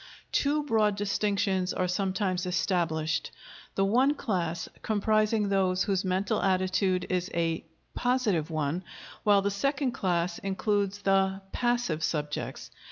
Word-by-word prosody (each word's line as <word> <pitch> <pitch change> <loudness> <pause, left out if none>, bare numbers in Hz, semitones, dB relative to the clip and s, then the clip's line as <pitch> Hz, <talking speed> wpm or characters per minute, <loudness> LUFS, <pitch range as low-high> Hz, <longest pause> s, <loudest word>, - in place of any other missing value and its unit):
Two 295 +1 +1
broad 220 -6 +2
distinctions 200 -2 0
are 185 - 0
sometimes 185 0 -1
established, 170 -3 0 0.5
the 195 - +2
one 255 +8 +3
class 170 - -2
comprising 215 0 +2
those 190 -1 +2
whose 195 -2 0
mental 190 +1 0
attitude 185 -1 +1
is 180 0 0
a 165 -1 0 0.3
"positive" 225 -11 +1
one 155 +2 -1 0.4
while 200 -2 +4
the 200 - +1
second 275 +6 0
class 175 -7 -1
includes 200 0 -1
the 195 0 +2
"passive" 240 -10 0
subjects. 150 -2 -3
195 Hz, 120 wpm, -28 LUFS, 180-210 Hz, 0.5 s, while